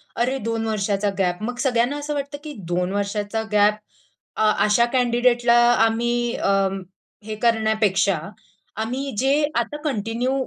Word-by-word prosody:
अरे 250 +3 0
2 225 -1 -1
वर्षाचा 205 -1 0
गॅप 180 +1 0
मग 245 +2 -3
सगळ्यांना 250 +2 +1
असं 290 +1 -4
वाटतं, 285 0 -4
की 305 -1 -7 0.2
2 180 +1 0
वर्षाचा 205 +2 -2
गॅप 210 0 +4 0.6
अ, 215 0 +3
अशा 215 +3 +4
कँडिडेटला 240 -1 +3 0.2
आम्ही 240 +1 +1
अ, - - -1 0.8
हे 215 0 -5
करण्यापेक्षा 220 -5 +2 0.6
आम्ही 260 +5 -3
जे 265 +5 +2 0.2
आता 295 - -1
कंटिन्यू 235 -2 -1
230 Hz, 130 wpm, -22 LUFS, 210-245 Hz, 0.8 s, गॅप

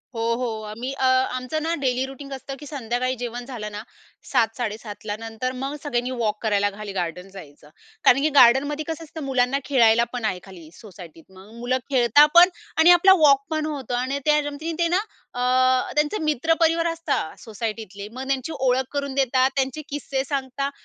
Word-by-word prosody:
हो, 225 - -2
हो 250 +1 -2 0.2
आम्ही 235 +5 -5
अ, 270 -1 -1 0.3
आमचं 255 +5 -3
ना 330 +1 0
डेली 255 0 +1
रुटीन 275 +1 -10
असतं 270 +1 -7
की 295 - -10
संध्याकाळी 255 -2 -2
जेवण 245 0 -5
झालं 225 -5 -6
ना, 210 0 -6 0.5
7:00ला-7:30ला 220 -3 -2
नंतर 225 +3 -4
मग 275 +2 -3
सगळ्यांनी 250 -3 -2
वॉक 215 -2 0
करायला 205 -2 +2
खाली 210 -1 -7
गार्डन 180 0 -4
जायचं. 150 -5 -13 0.3
कारण 270 - +5
की 305 - +2
गार्डनमध्ये 275 +5 +5
कसं 325 0 -5
असतं 315 -1 -8
मुलांना 265 0 +1
खेळायला 235 -4 +4
पण 245 -3 -3
आहे 185 -4 -1
खाली 180 -5 -13
सोसायटीत. 175 -6 -13
मग 190 +3 -15
मुलं 250 +2 0
खेळता 260 +2 +5
पण 350 +1 +9 0.3
आणि 320 +2 +7
आपला 355 +2 +7
वॉक 275 -1 +5
पण 310 -1 -1
होतं 275 -5 -4
आणि 260 +3 -2
त्या 300 0 +4
निमिते 325 +3 -2
ना 355 +3 +2 0.3
अ, 255 +1 +2
त्यांचे 300 +7 +1
मित्र 305 +2 +1
परिवार 330 0 +2
असतात 315 - -3
सोसायटीतले 215 -2 -6
मग 260 +2 -6
त्यांची 270 +3 -2
ओळख 260 0 +2
करून 280 -1 -2
देतात. 260 -1 +2
त्यांचे 270 +2 -1
किस्से 275 -2 -3
सांगतात. 275 0 -3
255 Hz, 175 wpm, -23 LUFS, 225-285 Hz, 0.5 s, पण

